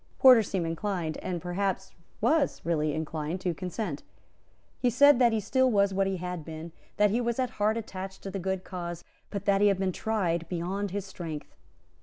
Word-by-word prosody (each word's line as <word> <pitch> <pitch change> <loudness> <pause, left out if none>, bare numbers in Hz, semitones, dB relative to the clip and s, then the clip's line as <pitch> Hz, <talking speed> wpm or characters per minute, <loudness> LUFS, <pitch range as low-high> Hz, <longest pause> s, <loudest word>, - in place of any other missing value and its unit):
Porter 255 -3 +8
seemed 190 -4 -2
inclined, 165 -1 -2
and 180 -2 -3
perhaps 190 +1 -2 0.3
was 285 +6 +2
really 155 -3 +1
inclined, 155 +2 -3
to 180 -2 0
consent. 180 -2 -4 0.8
He 250 - +3
said 280 +2 +6
that 240 -2 +5
he 220 - +1
still 260 +5 +2
was 200 -3 +3
what 195 0 +2
he 195 -1 -1
had 180 -2 -4
been, 160 +1 -7 0.3
that 210 -1 +4
he 235 +4 +1
was 235 -1 -1
at 255 -2 0
heart 215 +2 +3
attached 190 -3 -6
to 195 - -5
the 195 - -3
good 190 0 -2
cause, 175 -2 -6 0.3
but 200 -1 -5
that 200 -1 +3
he 205 - +6
had 200 -2 +3
been 190 0 0
tried 175 -5 -1
beyond 190 +3 -2
his 200 +1 -3
strength. 165 -6 -7
190 Hz, 195 wpm, -28 LUFS, 170-210 Hz, 0.8 s, Porter